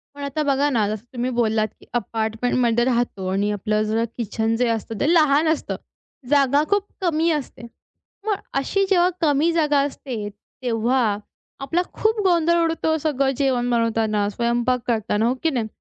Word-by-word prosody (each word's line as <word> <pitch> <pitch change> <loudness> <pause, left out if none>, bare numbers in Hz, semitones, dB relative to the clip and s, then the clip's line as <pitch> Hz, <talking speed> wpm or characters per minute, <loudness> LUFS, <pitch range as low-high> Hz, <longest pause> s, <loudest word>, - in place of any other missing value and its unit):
पण 285 - -7
आता 280 +2 -2
बघा 285 0 +2
ना, 225 -7 +1
जसं 215 0 -4
तुम्ही 245 0 -2
बोललात, 220 -2 +2
की - - -18
अपार्टमेंटमध्ये 230 +1 0
राहतो 240 -6 -1
आणि 200 +2 0
आपलं 210 +1 0
जर 220 +2 0
किचन 225 0 -1
जे 245 +1 +1
असतं 225 -1 -3
ते 310 +4 +2
लहान 305 -1 +4
असतं. 315 -1 -1 0.5
जागा 280 0 +4
खूप 405 -1 +2 0.2
कमी 335 -2 +1
असते. 275 - -8 0.6
मग 430 -1 +1 0.2
अशी 390 +8 0
जेव्हा 360 -2 +4
कमी 305 +1 +3
जागा 300 -3 +2
असते, 245 -7 -5 0.3
तेव्हा 235 -2 +1 0.4
आपला 325 +6 0
खूप 440 0 +1
गोंधळ 340 -1 +3
उडतो 325 -1 0
सगळं 275 -3 0
जेवण 255 -3 +1
बनवताना, 225 -3 +1
स्वयंपाक 235 +3 0
करताना 220 -2 0
हो 245 - +2
की 325 - +3
नाही? 240 -7 -2
250 Hz, 160 wpm, -22 LUFS, 225-300 Hz, 0.6 s, लहान